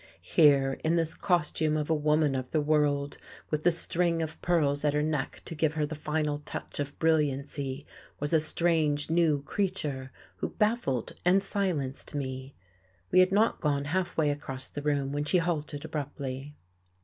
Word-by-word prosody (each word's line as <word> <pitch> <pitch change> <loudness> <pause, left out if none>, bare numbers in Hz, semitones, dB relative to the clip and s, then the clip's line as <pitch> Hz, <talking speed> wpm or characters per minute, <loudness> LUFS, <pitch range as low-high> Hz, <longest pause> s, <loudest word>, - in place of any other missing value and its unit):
Here, 140 -4 +4
in 160 +2 +2
this 165 -1 +1
costume 160 -4 +1
of 150 -1 -1
a 165 - +2
woman 150 -1 +2
of 130 -1 -3
the 155 - +1
world, 145 -1 +1 0.3
with 150 -1 0
the 175 - +5
string 170 0 0
of 160 0 -6
pearls 150 -5 +1
at 150 -1 +2
her 150 - +2
neck 150 -3 -2
to - - -6
give 155 -1 +1
her 155 -2 0
the 155 - -5
final 150 -1 -1
touch 150 - -7
of 140 0 -4
brilliancy, 140 -3 0 0.3
was 145 +2 -1
a 160 - +6
strange, 155 -2 +1
new 160 -4 +3
creature 150 -8 -2 0.3
who - - -2
baffled 210 - 0
and 190 +3 +4
silenced 170 -10 -2
me.... 130 -1 -4 0.6
We - - +6
had 185 +1 +5
not 215 +3 +2
gone 145 -2 0
halfway 170 -5 +1
across 135 -2 -4
the 145 - -6
room 140 -2 0
when 145 +1 -1
she 180 - +3
halted 160 -3 -2
abruptly. 140 -2 -5
150 Hz, 170 wpm, -29 LUFS, 145-165 Hz, 0.6 s, a